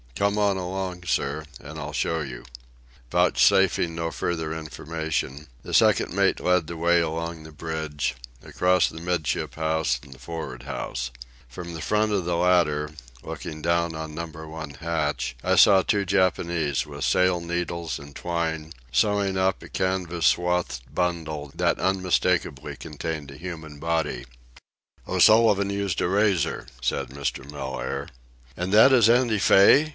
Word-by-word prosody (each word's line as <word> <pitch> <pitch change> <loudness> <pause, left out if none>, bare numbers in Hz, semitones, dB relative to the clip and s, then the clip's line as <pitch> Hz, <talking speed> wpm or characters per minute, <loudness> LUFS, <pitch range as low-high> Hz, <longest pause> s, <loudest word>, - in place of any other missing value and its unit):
Come 100 +5 +1
on 100 -2 +2
along, 90 -1 -4
sir, 75 -2 -1
and 75 +1 -9
I'll 75 0 -6
show 80 +2 0
you." 65 -4 -7 0.7
Vouchsafing 90 -1 +3
no 85 0 -2
further 80 -2 -2
information, 80 -2 -4 0.2
the - - -7
second - - +4
mate - - +2
led 90 -3 +2
the 85 - -6
way 85 +1 +3
along 85 0 -3
the 80 0 -11
bridge, 80 -4 -3 0.3
across 90 0 +2
the 80 - -8
'midship 85 -4 -1
house 80 0 0
and 70 -1 -12
the 65 - -17
for'ard 65 -3 -6
house. - - -4 0.4
From 85 +8 -8
the 80 - -6
edge 105 +4 +1
of 100 -4 0
the 85 0 0
latter, 85 -4 +2 0.3
looking 75 -1 -7
down 85 -1 +1
on 80 -1 -6
Number 80 -1 -7
One 80 -2 -7
hatch, 75 -5 -2
I - - +2
saw 100 -2 +7
two 100 +1 0
Japanese, 85 -6 +1
with 70 -1 -7
sail 90 -1 +3
needles 85 -1 -3
and 70 0 -12
twine, 80 -2 -3 0.2
sewing 100 +6 +2
up 95 0 +1
a - - -11
canvas 90 -3 0
swathed 90 -7 +1
bundle 80 -5 -2
that - - +1
unmistakably 90 -1 0
contained 75 -2 -6
a 70 - -11
human 80 -3 -8
body. 80 -6 -1 0.8
"O'Sullivan 100 +1 +5
used 100 -3 -1
a - - +2
razor," 100 -3 +1
said 60 -1 -1
Mr. 70 0 -4
Mellaire. 70 0 -4 0.5
"And 90 +2 -3
that 110 +6 +7
is 115 -4 +6
Andy 120 -3 +3
Fay?" 105 +10 +6
85 Hz, 150 wpm, -25 LUFS, 75-90 Hz, 0.8 s, saw